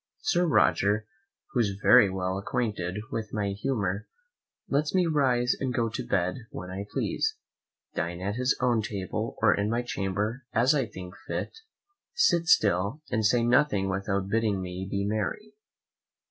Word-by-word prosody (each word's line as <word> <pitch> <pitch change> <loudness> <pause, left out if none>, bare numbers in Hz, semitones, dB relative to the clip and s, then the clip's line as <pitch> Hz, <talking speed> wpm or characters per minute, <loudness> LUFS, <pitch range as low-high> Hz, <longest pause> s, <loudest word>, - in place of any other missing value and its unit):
Sir 180 -12 +2
Roger, 105 -7 +3 0.5
who 125 - 0
is 100 -4 +1
very 100 0 +6
well 95 0 -2
acquainted 105 -5 -2
with 110 -2 -4
my 105 -2 -1
humour, 100 -3 -2 0.6
lets 150 +4 0
me 185 -1 +4
rise 130 -6 +2
and 130 -2 -1
go 120 -2 0
to 110 +4 -4
bed 90 -4 0
when 90 -2 -7
I 100 +2 -5
please, - - -1 0.6
dine 85 +1 -3
at 100 +2 -2
his 125 +2 +1
own 120 -3 +2
table 100 -4 -4
or - - +6
in 100 +1 0
my 120 +2 0
chamber 105 +3 -2
as 125 +6 +4
I 135 -5 +1
think 90 -3 -9
fit, - - -3 0.6
sit 315 - +3
still 105 - +3
and 110 - +1
say 120 +2 +3
nothing 120 -6 +3
without 95 0 -1
bidding 105 -1 +1
me 90 0 -5
be 100 0 -1
merry. 110 - -3
105 Hz, 160 wpm, -28 LUFS, 95-125 Hz, 0.6 s, very